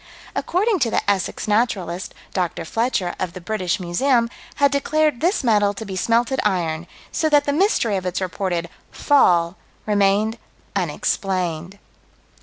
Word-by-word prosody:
According 400 +2 +1
to 240 -5 +2
the - - -1
Essex 200 0 0
Naturalist, 195 -5 0 0.2
Dr. 175 -2 -2
Fletcher, 215 -2 -1
of 180 -2 -3
the - - -7
British 185 -1 -2
Museum, 235 +7 +1 0.2
had 280 -1 +3
declared 300 -1 +1
this 345 -1 +1
metal 205 -4 +3
to 220 - -6
be 195 -2 -6
smelted 235 +6 +1
iron 170 -4 -1 0.2
"so 315 - +1
that 290 -1 +4
the 285 - +1
mystery 300 - +2
of 185 - -5
its 180 - -1
reported 185 -2 -2 0.2
'fall' 175 -10 +3 0.3
remained 210 +2 +2 0.4
unexplained." 180 0 -1
205 Hz, 140 wpm, -21 LUFS, 180-250 Hz, 0.4 s, that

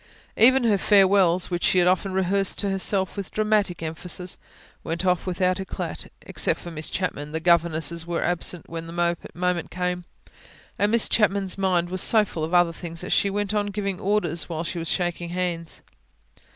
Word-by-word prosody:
Even 260 +3 +6
her 210 -4 +3
farewells, 190 -3 +4
which 175 0 -2
she - - +3
had 175 -1 +5
often 185 +1 +2
rehearsed 190 +1 +1
to 200 -2 -1
herself 190 0 -1
with 200 -2 -5
dramatic 210 -5 0
emphasis, 175 +2 -5 0.5
went 165 +3 -3
off 180 0 +1
without 185 +1 +1
eclat. 190 - -5
Except - - -1
for 175 - -8
Miss 155 -1 -3
Chapman, 150 -5 -3
the 160 - -1
governesses 170 -1 +1
were 170 -1 -1
absent 175 0 -1
when 165 0 -6
the 170 +1 0 0.2
moment 180 -1 -1
came, 180 -1 -3 0.7
and 205 +1 +2
Miss 235 -1 +4
Chapman's 200 -3 +1
mind 180 -3 +1
was 185 - 0
so 220 -2 +4
full 165 -5 -5
of 160 - -3
other 175 -2 +4
things 165 0 -7
that 180 - -5
she 200 - +3
went 205 +1 -2
on 205 -1 0
giving 200 -2 -3
orders 180 -5 0
while 165 -1 -3
she 175 0 -4
was 165 0 -2
shaking 175 -1 -1
hands. 175 -2 -3
180 Hz, 180 wpm, -24 LUFS, 170-195 Hz, 0.7 s, Even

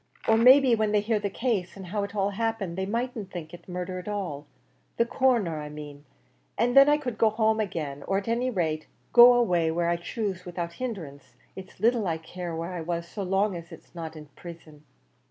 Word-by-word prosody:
Or 220 - +5
may 250 +5 +8
be 265 -3 +2
when 215 -2 +1
they 210 - +4
hear 215 +1 0
the 205 -1 -2
case, 200 -4 -2
and 190 - -8
how 205 +4 -2
it 200 - -6
all 200 0 +1
happened, 220 -4 -2
they 190 +1 -2
mightn't 230 -2 -3
think 170 -4 -8
it 175 +1 -12
murder 180 +1 -4
at 180 - -10
all, 180 -9 -4 0.5
the 235 - +3
Coroner 235 - +1
I 150 - -7
main; 145 -1 -10 0.5
and 245 +3 +1
then 275 +1 +8
I 295 - +4
could 250 -7 -5
go 225 - +5
home 220 0 +1
agin, 150 -8 -4
or 195 - +1
at 195 - -4
any 240 +3 0
rate 160 -8 -2 0.3
go 245 +1 +9
away 180 -9 +2
where 170 +1 0
I 170 - +1
choose 190 0 -4
without 175 -2 -5
hindrance; 165 - -6 0.2
it's 190 -1 -11
little 225 -1 +2
I 165 -1 0
care 170 +1 -7
where 165 +3 -4
I 175 - -4
was, 170 +1 -3
so 205 - -6
long 195 +1 +1
as 170 0 -9
it's - - -14
not 165 -2 -7
in 155 -1 -10
prison." 160 -3 -12
190 Hz, 220 wpm, -27 LUFS, 170-225 Hz, 0.5 s, go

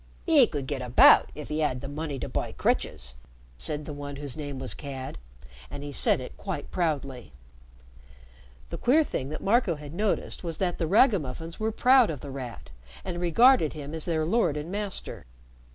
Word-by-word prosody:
"'E 300 -8 +6
could 145 -3 -4
get 135 -1 -3
about 125 0 +6
if 150 +1 -8
'e 155 +1 -1
'ad 130 -4 0
the 135 - -7
money 145 0 -4
to - - -4
buy - - -3
crutches!" 60 0 -1 0.4
said 150 - -4
one 145 -1 -6
whose 140 -2 -5
name 145 -3 -5
was 130 -1 -4
Cad, 135 -2 -7 0.5
and 140 - -7
he 145 0 -6
said - - +3
it 130 - -8
quite 185 -8 -5
proudly. 140 -8 -2 1.4
The - - -5
queer 295 +6 +4
thing 135 - -4
that 155 - -6
Marco 205 -4 +2
had 150 0 -10
noticed 205 +1 -2
was 165 -2 -4
that 180 -2 -1
the 165 - 0
ragamuffins 165 - +2
were 220 +1 0
proud 250 +1 +5
of 150 -5 -5
The 140 - -7
Rat, 125 - -8 0.3
and 175 - -4
regarded 180 - +5
him 150 -1 -7
as 160 -1 -4
their 160 -2 0
lord 170 -5 +1
and 150 +4 -5
master. 200 - -5
155 Hz, 185 wpm, -27 LUFS, 140-185 Hz, 1.4 s, E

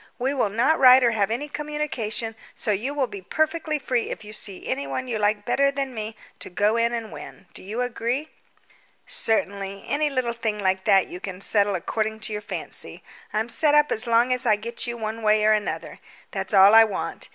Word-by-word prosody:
We 260 +3 -1
will 250 -7 +1
not 245 +10 +2
write 255 0 +8
or 235 - +4
have 210 -3 +1
any 245 +6 -2
communication, 280 -8 -3 0.2
so 220 - -2
you 215 +7 -1
will 280 -2 +1
be 200 -5 -9
perfectly 315 - -1
free 255 -4 -1
if 220 - -6
you 210 - -10
see 200 -3 -6
anyone 140 - -3
you 230 -3 -2
like 205 0 +1
better 280 0 +3
than 275 -1 -3
me 220 -1 -5 0.2
to - - -8
go 205 +4 +1
in 235 0 +2
and 230 -2 -4
win. - - -10
Do - - -9
you 215 +6 -4
agree?" 250 +4 -2 0.7
"Certainly; 200 -2 -1
any 300 +1 0
little 255 -4 -1
thing 225 -2 -2
like 190 -1 0
that 195 -3 +5
you 180 - -8
can 185 -1 -7
settle 200 0 +2
according 220 +4 -2
to 215 0 -3
your 210 - -3
fancy. - - -6 0.3
I'm 220 +2 -1
set 295 +4 +2
up 295 0 +4
as 220 +3 -1
long 235 +2 +3
as 250 0 -1
I 220 -4 +4
get 230 +3 -4
you 235 0 -4
one 220 0 -4
way 215 0 +3
or 215 - +5
another, 210 -1 -3 0.3
that's - - -3
all 195 +2 +8
I 225 0 +9
want. 215 -3 -4
225 Hz, 210 wpm, -24 LUFS, 210-255 Hz, 0.7 s, I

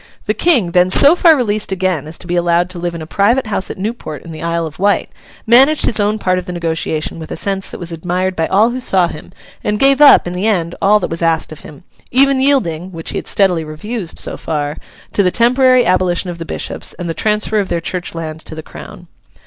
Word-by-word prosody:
The - - 0
King, 250 - +2
then 180 +1 +3
so 285 - +6
far 335 -3 +5
released 215 -6 -1
again 185 -5 -1
as 155 - -6
to - - -11
be 175 0 -2
allowed 175 +1 +1
to 180 - -6
live 170 0 -3
in 165 - -6
a - - -8
private 230 +10 +1
house 205 -3 -2
at - - -6
Newport 195 -7 -5
in 170 - -10
the 155 - -8
Isle 170 0 -1
of 155 +1 -9
Wight, 200 +1 +1 0.3
managed 265 +6 +5
his 225 - +1
own 210 +1 +1
part 185 -3 0
of 180 - -9
the - - -4
negotiation 165 -2 -3
with 160 - -9
a - - -5
sense 195 +2 -2
that - - -8
was 175 -1 -5
admired 180 +3 -2
by 165 -1 -1
all 215 +5 +3
who 255 - -4
saw 190 -7 +2
him, 155 - -10 0.3
and 210 0 -1
gave 275 +4 +3
up, 290 - +7
in 175 - -4
the 185 +4 -1
end, 175 -6 0
all 210 +2 +4
that - - -3
was 165 - -4
asked 165 -1 0
of 155 - -9
him—even 260 - -1
yielding 190 - +1
(which 165 -2 -5
he - - -2
had - - -10
steadily 180 -5 +1
refused, 175 +5 -5
so - - -4
far) 150 -1 -3 0.4
to - - +3
the 185 - +3
temporary 255 +3 +3
abolition 180 -1 0
of 170 - -10
the 165 - -5
bishops, - - -5
and 175 - -6
the 165 - -2
transfer 210 +4 0
of 195 - -2
their 170 - -1
church 175 +1 -5
land 160 -1 -6
to 160 - -10
the 160 - -8
Crown. - - -12
185 Hz, 245 wpm, -15 LUFS, 165-215 Hz, 0.4 s, up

